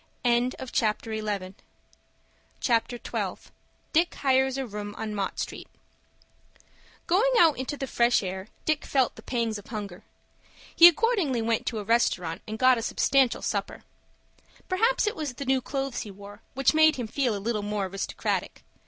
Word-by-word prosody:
CHAPTER 220 0 0
XII. 205 -3 -3 2.4
DICK 335 +2 +3
HIRES 265 -1 +2
A 270 - -2
ROOM 205 -2 -6
ON 220 -1 -4
MOTT 200 -2 -3
STREET - - -5 1.4
Going 420 +9 +3
out 325 -4 +6
into 265 +3 -4
the 270 - -3
fresh 240 -3 +2
air 190 +1 -5 0.2
Dick 310 -1 0
felt 265 -3 +1
the - - -12
pangs 230 -4 -2
of 205 - -15
hunger. 205 -5 -7 0.7
He 340 - +11
accordingly 345 - +2
went 225 0 0
to 230 - -2
a 210 - -3
restaurant 190 -6 +1
and 215 +1 -5
got 255 0 +5
a - - -4
substantial 265 +2 +2
supper. - - -3 0.8
Perhaps 450 +7 +2
it 420 - -1
was 295 -5 -4
the 280 - -6
new 265 0 +2
clothes 270 0 -3
he 215 - -7
wore, 205 +1 -12
which 270 +2 +3
made 315 0 +5
him 245 - -4
feel 240 0 0
a - - -2
little 210 +1 -2
more 205 -1 -2
aristocratic. 195 +1 -3
235 Hz, 155 wpm, -27 LUFS, 210-275 Hz, 2.4 s, He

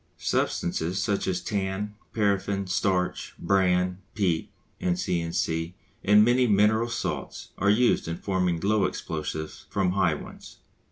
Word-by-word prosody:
Substances 85 +2 -1
such 100 -1 0
as 90 -1 0
tan, 100 +1 -2 0.2
paraffin, 100 -2 0
starch, 90 0 -1
bran, 90 0 +2 0.2
peat, 90 -6 0 0.5
&c., 85 -2 -1
&c., 80 +1 -1 0.3
and 105 +1 +6
many 125 +1 +4
mineral 110 +3 +3
salts, 120 - -4
are 100 - +3
used 115 -1 +3
in 85 0 -3
forming 90 -3 0
low 105 0 +2
explosives 80 -3 -4
from 95 -2 +1
high 90 -4 +2
ones. - - -11
95 Hz, 125 wpm, -26 LUFS, 90-105 Hz, 0.5 s, and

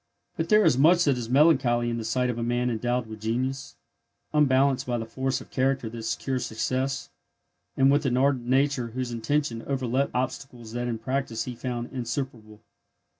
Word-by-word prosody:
But 165 - -2
there 215 0 +5
is 125 - +4
much 170 +4 +6
that 140 -4 +3
is 120 -2 -5
melancholy 130 -4 +3
in 115 - -2
the - - -4
sight 125 +3 0
of 120 - -5
a - - -2
man 120 +1 0
endowed 120 +2 -1
with 110 -1 -10
genius, 130 +4 -2 0.6
unbalanced 135 -3 +3
by 120 -1 0
the 115 - -4
force 130 +3 -2
of - - -14
character 130 -3 0
that 115 0 -7
secures 125 +3 -2
success, 130 +4 -2 0.7
and 135 +1 +5
with 145 0 +2
an 125 -1 +1
ardent 130 -2 +1
nature 135 -1 +2
whose 125 +1 -4
intention 115 +1 -1
overleapt 135 0 -1
obstacles 125 -2 -4
that 120 +1 -3
in 115 -2 -2
practice 130 -1 -2
he 125 - -5
found 120 0 -4
insuperable. 115 -4 -5
125 Hz, 180 wpm, -26 LUFS, 120-135 Hz, 0.7 s, much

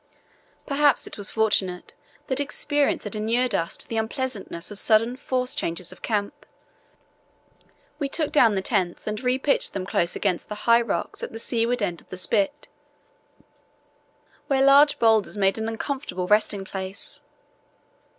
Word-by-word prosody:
Perhaps 285 -1 +2
it - - -8
was 205 -2 0
fortunate 195 -5 0 0.3
that 260 -1 -1
experience 290 0 +1
had 210 0 -4
inured 230 +3 0
us 170 -3 -1
to - - -3
the 225 - -3
unpleasantness 220 -6 -3
of 205 - -8
sudden 225 +2 +3
forced 255 -1 -2
changes 170 +1 -3
of - - -14
camp. 215 +6 -2 1.6
We 280 -2 -1
took 310 +1 -1
down 230 -8 +5
the 190 - -1
tents 175 -3 -1
and 215 +1 -3
re 250 0 +1
pitched 275 +1 +2
them 190 -2 -3
close 170 -1 0
against 175 - -1
the 210 - -4
high 235 0 +6
rocks 200 -7 -3
at - - -6
the - - -5
seaward 230 0 -1
end 175 -4 -2
of - - -27
the 185 - -7
spit, 210 +9 0 1.8
where 270 -1 +2
large 280 +2 +6
boulders 220 -4 +2
made 195 +1 +2
an 220 - -2
uncomfortable 225 -4 -3
resting 210 0 +2
place. 190 +1 -6
220 Hz, 155 wpm, -24 LUFS, 195-260 Hz, 1.8 s, high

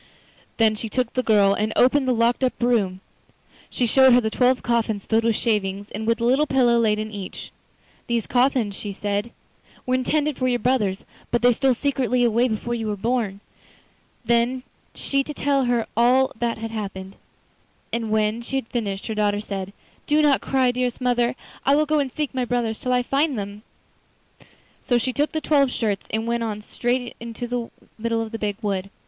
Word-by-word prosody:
Then 220 -2 +4
she 215 +1 -5
took 250 +1 -1
the 255 - +1
girl 205 -4 +4
and 215 +2 -1
opened 260 +2 +3
the - - +3
locked 235 +2 +1
up 255 - +2
room; 210 -6 +1 0.7
she 245 - 0
showed 265 +2 +6
her 245 - +7
the 220 -2 -2
twelve 250 +2 +2
coffins 225 -4 0
filled 225 0 +2
with 230 -1 +2
shavings, 205 -3 -1
and 220 +2 -5
with 230 0 +2
the 235 - -4
little 270 +5 +3
pillow 245 -4 +3
laid 215 -2 +2
in 215 0 -4
each. 200 -3 -8 0.6
'These 235 -2 0
coffins,' 245 -5 +1
she 205 0 -6
said, 205 +2 -2 0.6
'were 255 - -1
intended 290 +3 0
for 255 - +1
your 245 -1 +2
brothers, 225 -7 0 0.2
but 240 0 0
they 245 0 +6
stole 265 +1 +2
secretly 255 -2 0
away 235 +1 +3
before 235 +1 -3
you 225 -2 -3
were 210 - -1
born.' 215 -2 -1 0.8
Then 240 +2 +1 0.3
she 275 0 0
proceeded 295 +2 -6
to - - -9
tell 275 -2 +2
her 240 -2 +1
all 250 +3 +4
that 235 -1 -1
had 225 0 -5
happened, 195 -3 -6 0.8
and 230 -1 -1
when 215 +1 +1
she 235 - -6
had 270 - -1
finished 200 -5 -3
her 220 - -3
daughter 205 -1 +1
said: 195 -2 -5 0.4
'Do 305 +1 +3
not 285 -3 +4
cry, 260 -2 +2
dearest 245 -1 -2
mother; 245 -1 +1 0.3
I 275 - +4
will 305 +1 +3
go 305 0 +1
and 275 -3 -1
seek 300 +2 -3
my 255 -1 -1
brothers 235 -2 -1
till 250 - -2
I 250 0 +2
find 275 +1 0
them.' 205 0 -6 1.2
So 245 - +1
she 255 +2 -1
took 295 +3 0
the 315 - -2
twelve 280 -4 +3
shirts 210 -5 -2
and 220 +1 -2
went 235 0 -1
on 210 -2 -3
straight 245 +2 -2
into 235 +1 -6
the 240 -1 -3 0.3
middle 230 0 0
of 220 - -8
the 225 - -5
big 205 -2 -2
wood. 195 -1 -2
235 Hz, 200 wpm, -23 LUFS, 215-255 Hz, 1.2 s, her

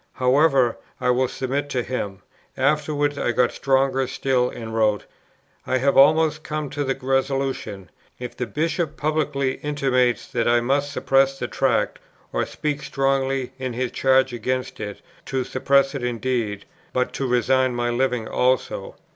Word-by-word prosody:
However, 130 -1 +3 0.2
I 125 - +2
will 130 +1 +2
submit 135 +3 -3
to 125 -3 -1
him." 100 -7 -4 0.3
Afterwards, 145 -1 +1
I 120 - 0
got 125 0 +2
stronger 135 -1 +1
still 125 -1 +1
and 115 -1 -7
wrote: 105 -2 +2 0.6
"I 130 - +2
have 140 +2 +2
almost 155 +2 +5
come 155 -2 -4
to 145 0 -2
the 135 -1 -1
resolution, 135 -7 -2 0.3
if 125 -1 -7
the 125 - -3
Bishop 160 0 -2
publicly 145 -3 0
intimates 135 -4 +1
that 120 -2 0
I 120 0 +4
must 140 +4 0
suppress 135 -1 +2
the - - -3
Tract, - - 0 0.3
or - - 0
speaks 150 -1 -3
strongly 135 -1 0
in 130 -2 -3
his 125 +1 -2
charge 130 -1 +3
against 130 +2 -3
it, 105 -2 -6 0.3
to 130 -1 -1
suppress 135 +2 +2
it 140 - -4
indeed, 120 -4 -2 0.3
but 125 0 0
to 135 - -2
resign 130 +1 +2
my 120 0 0
living 125 -2 0
also. 130 0 0
130 Hz, 155 wpm, -23 LUFS, 125-140 Hz, 0.6 s, almost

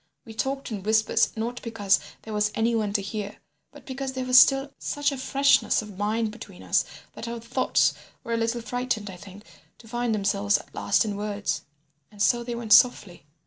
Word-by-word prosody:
We 225 - -10
talked 270 +3 -3
in 205 -3 -4
whispers 215 +2 +2
not 235 +3 -3
because 205 - +1 0.2
there 220 - -7
was 210 0 +1
any 230 +1 +1
one 215 -3 0
to 205 -2 0
hear, 205 0 -5 0.3
but - - -15
because 270 -1 -5
there 260 -1 -3
was 255 0 +8
still 270 +1 +4
such 290 0 -1
a 275 - -4
freshness 270 -5 +3
of 205 -3 -11
mind 215 +1 0
between 230 - -11
us - - +2 0.3
that - - -7
our 235 0 -5
thoughts 240 +3 +1 0.3
were 230 - -3
a - - +1
little 230 +1 -1
frightened, 240 -5 -3
I - - -10
think, 200 +2 -13 0.3
to 225 - -17
find 240 -1 -1
themselves 205 0 +1
at - - -13
last - - +1
in 210 -2 -3
words. 205 0 -2 0.5
And 205 - -17
so 240 +4 +3
they 240 0 -4
went 230 -2 +1
softly. 180 - +4
225 Hz, 200 wpm, -25 LUFS, 205-245 Hz, 0.5 s, was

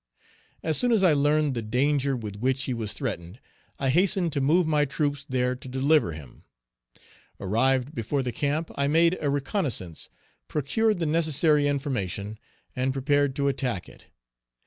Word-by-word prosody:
As 160 -2 +2
soon 245 - +3
as 220 -4 +3
I 175 -4 +5
learned 145 0 +2
the 120 - -3
danger 135 +5 +1
with 105 -4 -6
which 130 +4 0
he 130 - -2
was 110 -3 -3
threatened, 100 -5 -5 0.4
I 135 -1 +1
hastened 175 0 +2
to 140 - 0
move 165 +6 +3
my 150 -1 +2
troops 145 0 -2
there 125 -1 0
to 130 - -12
deliver 135 - +2
him. 75 -6 -12 1.0
Arrived 130 +7 +1
before 130 +4 -2
the 125 - -2
camp, 150 +6 -2
I 140 0 0
made 165 +4 +3
a 145 - 0
reconnoissance, 140 - -2 0.4
procured 210 - 0
the 170 - -1
necessary 155 -1 +2
information 110 - -3 0.4
and 130 +1 0
prepared 140 0 +1
to 140 -1 0
attack 125 - -2
it. - - -16
140 Hz, 160 wpm, -26 LUFS, 125-150 Hz, 1.0 s, I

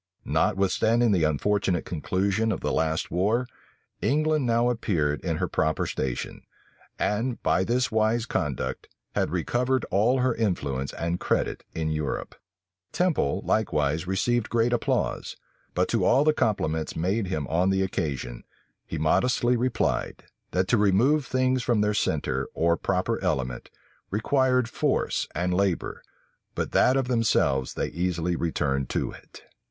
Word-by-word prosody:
Notwithstanding 110 +5 +2
the 90 -5 +3
unfortunate 90 +4 0
conclusion 100 +6 0
of - - -3
the - - -1
last 80 0 0
war, 105 +9 +1 0.6
England 155 -1 +1
now 120 +1 +3
appeared 80 -11 0
in 85 -3 -1
her - - -1
proper 80 0 0
station, 65 -2 -3 0.6
and, 115 +4 -1
by 95 - +2
this 125 +5 0
wise 110 +1 +1
conduct, 65 - -3 0.2
had - - 0
recovered 120 - 0
all 120 +6 +3
her 130 -1 +2
influence 70 - -1
and 85 +2 -2
credit - - -1
in 80 -1 -1
Europe. 75 -3 -3 0.6
Temple 175 - 0
likewise 80 -6 0
received 115 +4 0
great 120 +1 +2
applause; 120 - -1 0.4
but 90 +1 +2
to 115 -5 +1
all 130 +9 +4
the 155 0 +4
compliments 80 - -1
made 95 +5 0
him 80 -6 -2
on 90 +3 +2
the 95 0 +2
occasion, 70 -9 -3 0.4
he 80 - -4
modestly 120 +10 +2
replied, 125 0 -1 0.3
that 90 0 0
to 120 - +3
remove 120 +9 +3
things 130 0 +1
from 120 -4 +1
their 105 0 +2
centre, 65 -8 -1
or 85 +1 +3
proper 95 +1 -1
element, 65 -2 -2 0.4
required 125 +3 +2
force - - 0
and 90 +1 0
labor; 95 -1 0 0.5
but - - -2
that 130 +2 +4
of 135 -2 0
themselves 110 - +1
they - - -1
easily 85 0 -1
returned 70 -5 -1
to - - -1
it. - - -14
95 Hz, 140 wpm, -26 LUFS, 80-120 Hz, 0.6 s, all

